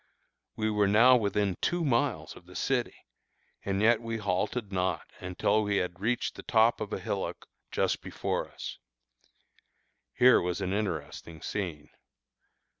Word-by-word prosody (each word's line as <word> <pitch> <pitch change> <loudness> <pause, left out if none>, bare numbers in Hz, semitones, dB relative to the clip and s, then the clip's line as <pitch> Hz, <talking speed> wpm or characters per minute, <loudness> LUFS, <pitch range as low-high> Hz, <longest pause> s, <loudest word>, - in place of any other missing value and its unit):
We 110 0 0
were 105 -1 +3
now 115 +6 +7
within 100 -4 +1
two 175 -1 0
miles 120 - 0
of 90 - -15
the 90 - -14
city, 130 -3 0 0.7
and 100 +1 -1
yet 115 +1 +5
we 115 -1 -3
halted 105 +2 -2
not 95 -1 -1
until 95 +4 +1
we 100 -1 0
had 90 -1 -2
reached 115 +5 0
the - - -9
top 115 0 +3
of 105 - -4
a - - -2
hillock - - -4 0.3
just - - 0
before - - -3
us. - - -8 1.4
Here 125 0 +6
was 90 +1 -2
an 95 -1 -2
interesting 85 -5 -4
scene. 80 -7 -4
105 Hz, 145 wpm, -29 LUFS, 90-115 Hz, 1.4 s, now